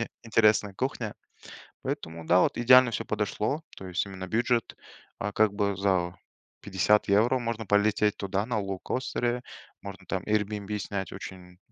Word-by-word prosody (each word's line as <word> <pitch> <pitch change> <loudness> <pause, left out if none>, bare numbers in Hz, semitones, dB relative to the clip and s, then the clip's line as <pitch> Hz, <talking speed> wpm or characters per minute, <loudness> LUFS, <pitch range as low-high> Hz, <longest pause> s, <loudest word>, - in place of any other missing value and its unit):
мне 115 - -2 0.2
интересная 105 -3 +3
кухня. 120 -3 -3 0.7
Поэтому, 80 0 -5
да, 90 +2 +5
вот - - +2
идеально 125 0 +6
всё - - -2
подошло, 110 +7 -1
то 95 - -8
есть 90 +2 -1
именно 95 -1 -7
бюджет, 115 +1 0 0.4
а, 105 +1 -3
как 110 -1 +3
бы 100 -1 0
за 95 -3 +1 0.5
50 100 +2 +2
евро 115 +6 +4
можно 115 -2 -3
полететь 105 +1 +2
туда 100 +2 -2
на 115 -4 -1
лоукостере, 120 +5 -2 0.4
можно 100 0 -9
там 95 -2 -2
Airbnb 105 -1 -1
снять 95 -2 -4
очень, 95 - -7
м, 90 -1 -16
105 Hz, 155 wpm, -28 LUFS, 95-115 Hz, 0.7 s, идеально